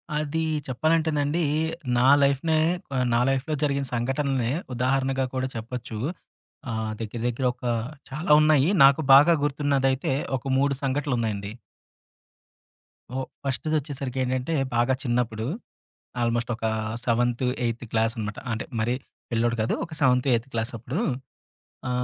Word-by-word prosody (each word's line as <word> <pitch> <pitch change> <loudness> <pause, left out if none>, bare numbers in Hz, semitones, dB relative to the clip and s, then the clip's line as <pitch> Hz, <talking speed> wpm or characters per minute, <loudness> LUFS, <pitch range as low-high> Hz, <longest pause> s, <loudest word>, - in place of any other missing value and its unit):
అది 155 +2 -1 0.3
చెప్పాలంటేనండి. 155 +3 +1 0.5
నా 125 - +4 0.2
లైఫ్‌‌‌నే 140 +4 +2 0.3
కొ 135 - -4 0.2
నా 115 - +4
లైఫ్‌లో 135 +3 0
జరిగిన 140 -1 +1
సంఘటల్నే 130 0 0 0.2
ఉదాహరణగా 130 +1 +1
కూడా 130 0 -1
చెప్పొచ్చు. 115 0 -6 0.7
ఆహ్, 110 -1 -2
దెగ్గర 115 +1 -5
దెగ్గర 125 +2 -2
ఒక 125 - -26 0.5
చాలా 150 +3 -2
ఉన్నాయి. 155 0 +4
నాకు 140 +3 +6
బాగా 155 +5 +8
గుర్తున్నదైతే 140 -2 +1 0.2
ఒక 130 - -9
మూడు 140 +1 +2
సంఘటనలున్నాయండి. 120 -7 -1 1.6
ఓహ్! 130 -1 -2 0.2
ఫస్ట్‌ది 140 +3 -1
ఒచ్చేసరికి 140 -3 -6
ఏంటంటే. 130 +4 -1 0.2
బాగా 120 +2 +3
చిన్నప్పుడు. 120 -3 -1 0.8
ఆల్మోస్ట్ 120 0 0
ఒక 115 - -5 0.4
సెవెన్త్ 120 +1 +1 0.2
ఎయిత్ 115 +1 -2
క్లాస్ 115 0 +1
అనమాట. 105 -2 -4
అంటే 115 - -3
మరరీ 120 +3 +1 0.4
పిల్లోడు 120 0 +1
కాదు. 110 - 0
ఒక 165 - -11
సెవెన్త్ 125 0 +3
ఎయిత్ 115 +3 0
క్లాస్ 115 +1 -2
అప్పుడు. 125 - -4 0.9
ఆ! - - -1
130 Hz, 125 wpm, -25 LUFS, 120-140 Hz, 1.6 s, బాగా